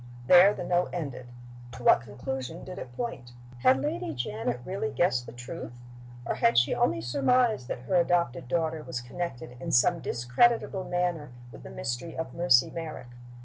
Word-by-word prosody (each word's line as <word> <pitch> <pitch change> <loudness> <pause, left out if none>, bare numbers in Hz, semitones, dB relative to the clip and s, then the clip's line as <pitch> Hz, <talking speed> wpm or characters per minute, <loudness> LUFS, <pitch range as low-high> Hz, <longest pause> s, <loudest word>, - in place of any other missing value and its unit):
There 180 +7 +8
the 205 - -5
note 175 0 +1
ended. 140 -7 -5 0.5
To 125 - -9
what - - +6
conclusion 130 +7 -6
did 185 - -8
it 120 - -8
point? 125 - -5 0.3
Had 130 +1 +4
Lady 145 +1 -3
Janet 120 0 -3
really 185 -6 -2
guessed 130 -4 +1
the - - -8
truth? 120 +2 -8 0.5
or - - -1
had 115 0 +2
she 120 - +4
only 110 0 +1
surmised 140 - +2
that 120 - -4
her 125 - -5
adopted 170 -8 +1
daughter 160 +2 -1
was 125 - -5
connected 125 -1 -6
in - - -4
some 170 +8 +4
discreditable 185 - +1
manner 175 -4 -1 0.2
with - - -12
the - - -10
mystery 120 +8 -5
of 165 - -4
"Mercy 170 -8 +4
Merrick"? 155 -7 -7
140 Hz, 170 wpm, -28 LUFS, 120-175 Hz, 0.5 s, There